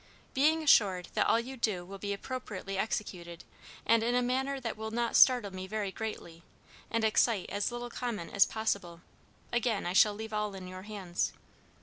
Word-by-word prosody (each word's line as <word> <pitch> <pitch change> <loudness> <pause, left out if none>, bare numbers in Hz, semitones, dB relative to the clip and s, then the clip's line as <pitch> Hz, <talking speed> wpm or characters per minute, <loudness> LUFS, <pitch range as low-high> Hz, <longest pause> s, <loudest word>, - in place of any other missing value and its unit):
"Being 310 +4 +3
assured 195 - +4
that - - +2
all 230 - +4
you 255 +3 -6
do 210 -7 -1
will 195 +2 -9
be 200 +1 -3
appropriately 200 -3 -5
executed, 180 -4 -3 0.4
and 230 0 +4
in 240 +2 +1
a 250 - +3
manner 265 +2 -1
that 235 -4 -4
will 220 0 -5
not 235 +1 -1
startle 245 -7 +6
me 185 0 -6
very 210 -1 -2
greatly, 190 -6 -6 0.5
and 230 -1 0
excite 220 -2 +2
as 205 +3 -1
little 240 0 -5
comment 230 -10 -4
as 200 - +5
possible, 200 -6 -2 0.5
again 235 -3 0
I 175 - -1
shall 205 +2 +5
leave 220 +1 -7
all 210 -1 -1
in 185 -1 -8
your 185 0 -8
hands. 190 -4 -2
215 Hz, 185 wpm, -31 LUFS, 190-240 Hz, 0.5 s, startle